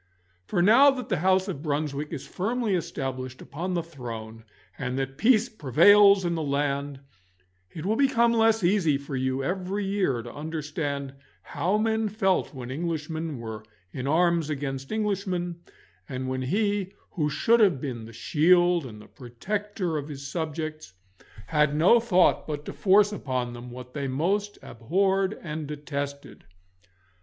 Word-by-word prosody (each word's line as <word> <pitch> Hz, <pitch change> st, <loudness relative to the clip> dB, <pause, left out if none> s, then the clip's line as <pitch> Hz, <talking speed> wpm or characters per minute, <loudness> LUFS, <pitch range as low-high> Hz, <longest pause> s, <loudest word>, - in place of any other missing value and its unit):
For 175 Hz, -, +1 dB
now 240 Hz, +9 st, +7 dB
that 260 Hz, -2 st, -3 dB
the 185 Hz, -, +1 dB
house 190 Hz, +3 st, +2 dB
of 175 Hz, -8 st, -4 dB
Brunswick 150 Hz, -1 st, -2 dB
is 135 Hz, -, -6 dB
firmly 225 Hz, +2 st, -1 dB
established 130 Hz, -6 st, -4 dB
upon 180 Hz, +5 st, -4 dB
the 170 Hz, -, 0 dB
throne 115 Hz, -7 st, -8 dB, 0.3 s
and 125 Hz, -1 st, -3 dB
that 135 Hz, 0 st, -3 dB
peace 225 Hz, -, +4 dB
prevails 200 Hz, -, +5 dB
in 170 Hz, -, 0 dB
the 165 Hz, -, -2 dB
land, 140 Hz, -1 st, -2 dB, 0.7 s
it 155 Hz, -, -8 dB
will 215 Hz, +3 st, +1 dB
become 235 Hz, -3 st, +3 dB
less 225 Hz, -2 st, +3 dB
easy 175 Hz, -6 st, +3 dB
for 140 Hz, 0 st, -7 dB
you 130 Hz, +1 st, -1 dB
every 190 Hz, +5 st, -2 dB
year 190 Hz, -, 0 dB
to 120 Hz, -, -9 dB
understand 145 Hz, -2 st, -4 dB, 0.3 s
how 185 Hz, +7 st, -1 dB
men 220 Hz, 0 st, 0 dB
felt 195 Hz, -3 st, +1 dB
when 130 Hz, -3 st, -7 dB
Englishmen 160 Hz, 0 st, -3 dB
were 110 Hz, -2 st, -7 dB, 0.3 s
in 125 Hz, +6 st, -5 dB
arms 170 Hz, 0 st, +2 dB
against 135 Hz, -2 st, -4 dB
Englishmen, 190 Hz, -5 st, -2 dB, 0.5 s
and 130 Hz, 0 st, -4 dB
when 130 Hz, 0 st, -2 dB
he 200 Hz, +6 st, 0 dB, 0.2 s
who 150 Hz, -5 st, -1 dB
should 230 Hz, +10 st, +3 dB
have 190 Hz, -, +4 dB
been 125 Hz, -5 st, -5 dB
the 115 Hz, -, -11 dB
shield 175 Hz, +6 st, +3 dB
and 105 Hz, -3 st, -11 dB
the 105 Hz, -, -14 dB
protector 185 Hz, -, -4 dB
of 145 Hz, -, -7 dB
his 140 Hz, -2 st, -8 dB
subjects 155 Hz, -, -4 dB, 0.5 s
had 150 Hz, +3 st, +2 dB
no 180 Hz, +10 st, +6 dB
thought 185 Hz, -6 st, +3 dB
but 150 Hz, -1 st, -4 dB
to -, -, -6 dB
force 205 Hz, +1 st, +4 dB
upon 130 Hz, -9 st, -3 dB
them 120 Hz, +1 st, -9 dB
what 125 Hz, +1 st, -10 dB
they 140 Hz, -2 st, -3 dB
most 195 Hz, +10 st, -1 dB
abhorred 190 Hz, -, 0 dB
and 155 Hz, -2 st, -5 dB
detested. 140 Hz, -1 st, -6 dB
155 Hz, 155 wpm, -26 LUFS, 135-195 Hz, 0.7 s, now